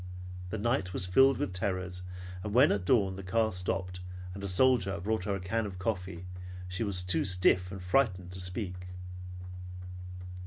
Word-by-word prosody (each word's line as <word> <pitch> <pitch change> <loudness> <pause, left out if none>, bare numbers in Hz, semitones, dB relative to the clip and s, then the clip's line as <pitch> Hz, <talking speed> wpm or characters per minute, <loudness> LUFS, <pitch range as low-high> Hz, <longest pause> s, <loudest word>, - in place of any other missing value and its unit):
The 110 - -2
night 110 -4 +1
was 90 - 0
filled 135 +8 +6
with 95 - -1
terrors, 90 -1 -2 0.4
and 105 0 -3
when 130 +4 +7
at 100 -3 0
dawn 95 -4 +3
the - - -5
car 110 +4 +2
stopped, 90 0 -2 0.3
and 100 +1 -7
a - - -1
soldier 100 -2 +4
brought 105 +1 0
her 100 -2 +1
a - - -3
can 105 +4 -1
of 95 -2 -7
coffee 90 -3 -2 0.4
she 90 +4 -1
was 95 -4 +1
too 90 -3 +2
stiff 90 -1 +3
and 95 -2 -6
frightened 90 -3 +2
to 90 - -5
speak. 90 0 -2
95 Hz, 170 wpm, -31 LUFS, 90-105 Hz, 0.4 s, when